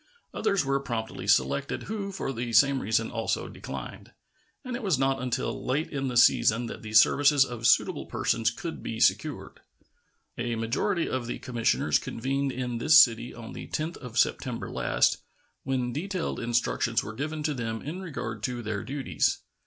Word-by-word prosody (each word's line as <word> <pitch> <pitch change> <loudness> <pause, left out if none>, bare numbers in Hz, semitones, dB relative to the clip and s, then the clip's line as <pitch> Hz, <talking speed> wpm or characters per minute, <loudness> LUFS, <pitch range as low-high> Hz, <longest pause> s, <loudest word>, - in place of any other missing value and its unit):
Others 195 -7 +1
were 135 0 +1
promptly 115 -4 -5
selected, 65 +2 +1
who 200 -2 -4
for 185 -8 -4
the 120 0 -4
same 135 +2 +5
reason 110 +2 0
also 115 0 -2
declined, - - -8 0.5
and 250 -1 -4
it 245 - -5
was 190 - +1
not 135 0 +1
until 125 -1 -2
late 140 +5 -1
in 135 -2 -2
the 125 -2 -1
season 120 0 +5
that - - -7
the 110 -1 -8
services 140 +5 +6
of 120 -3 -2
suitable - - +2
persons 115 -1 +1
could 160 +9 -6
be 115 - -5
secured. - - +1 0.8
A 120 0 -1
majority 120 - 0
of 130 -2 -3
the - - -3
commissioners 115 -11 +1
convened 135 +3 -2
in 125 -2 -3
this 155 +5 +6
city 120 -3 +5
on 115 -2 -9
the - - -8
10th 160 +3 -3
of 125 -4 -9
September - - 0
last, - - +2 0.4
when 125 -2 -2
detailed 185 +3 -3
instructions 115 -1 0
were 110 - -6
given 150 +5 -4
to 150 0 0
them 115 -3 -4
in 165 +7 -5
regard 115 - -5
to 120 +1 -3
their 105 -2 -3
duties. 135 0 0
125 Hz, 170 wpm, -27 LUFS, 115-145 Hz, 0.8 s, services